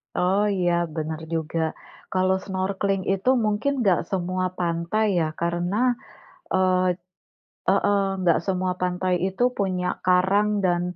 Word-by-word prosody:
Oh 190 +3 +2
iya, 175 -1 +2 0.2
benar 155 -1 -3
juga. 165 0 -2 0.5
Kalau 185 0 +2
snorkeling 190 0 -1
itu 195 +5 0 0.2
mungkin 215 +6 +1
enggak 190 -5 +3
semua 185 -1 -1
pantai 170 +5 0
ya, 160 - +1
karena 175 +2 -1 0.8
eee, 185 -1 +3 0.9
heeh, 200 -1 +2
enggak 175 -3 +3
semua 185 -1 0
pantai 180 0 0
itu 190 +4 -3 0.2
punya 185 -3 0 0.2
karang 190 +3 +3 0.2
dan, 175 -1 +2
185 Hz, 120 wpm, -24 LUFS, 175-195 Hz, 0.9 s, enggak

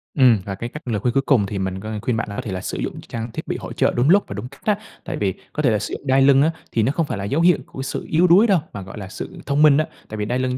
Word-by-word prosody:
Ừm, 125 -6 +6
và 100 - -4
cái 115 +5 -5
cách 150 0 -10
lời 110 -4 0
khuyên 120 +3 0
cuối 135 - +3
cùng 120 -8 +3
thì 100 0 -4
mình 95 0 -2
có 110 +3 -6
khuyên 120 0 0
bạn 115 - -2
là 100 - -6
có - - -3
thể 115 -5 -6
là 95 0 -3
sử - - -4
dụng - - -4
trang 115 0 -6
thiết - - -6
bị - - -2
hỗ - - -7
trợ - - +2
đúng 125 +5 +2
lúc 200 +3 +6
và - - -6
đúng 110 +4 -5
cách - - -17
á. 210 -1 +2 0.3
Tại - - -4
vì 95 -3 0 0.2
có 150 - -2
thể 130 - +4
là 105 - +1
sử - - -5
dụng 140 - -7
đai 135 +1 +4
lưng 135 0 +6
á 155 +3 +3 0.2
thì 115 - +1
nó 130 - +2
không 165 +2 0
phải 140 - -4
là 100 - -4
dấu 140 +11 0
hiệu 175 -1 +5
của 135 - -8
sự 135 - -4
yếu 170 +3 +4
đuối 195 +7 +6
đâu, 190 -5 +4
mà 100 - -5
gọi 95 +2 -9
là 100 - -6
sự - - -7
thông 140 +1 +1
minh 150 -2 +7
á. 155 - +2 0.2
Tại 110 - -6
vì 105 - -2
đai 125 +4 -1
lưng 130 0 -1
125 Hz, 360 wpm, -21 LUFS, 105-145 Hz, 0.3 s, minh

